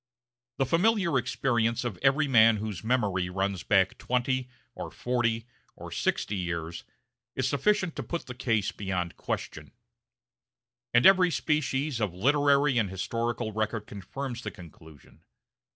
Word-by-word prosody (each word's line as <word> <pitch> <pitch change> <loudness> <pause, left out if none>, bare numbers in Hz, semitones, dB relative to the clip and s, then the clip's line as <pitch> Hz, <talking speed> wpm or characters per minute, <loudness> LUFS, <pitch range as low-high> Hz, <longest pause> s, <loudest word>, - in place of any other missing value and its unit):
The 135 - +2
familiar 180 - +2
experience 120 -1 0
of 110 -8 -4
every 140 +3 +3
man 115 -4 +6
whose 105 -2 -5
memory 105 -7 0
runs 95 0 -2
back 95 -2 +2
twenty, 125 +1 -1 0.2
or - - -6
forty, 115 -2 -1 0.3
or - - -9
sixty 105 - -1
years, 85 -2 -4 0.5
is 130 - 0
sufficient 180 +6 +1
to - - -2
put 170 - -4
the 125 - -7
case 115 -5 0
beyond 90 -4 -3
question; - - -5 1.2
and 120 +1 +4
every 185 -2 +7
species 150 -4 0
of 100 -5 -1
literary 140 +3 +3
and 105 -4 0
historical 115 +4 -2
record 110 0 -2
confirms 120 +6 -6
the - - -4
conclusion. 80 -6 -15
120 Hz, 135 wpm, -28 LUFS, 100-135 Hz, 1.2 s, every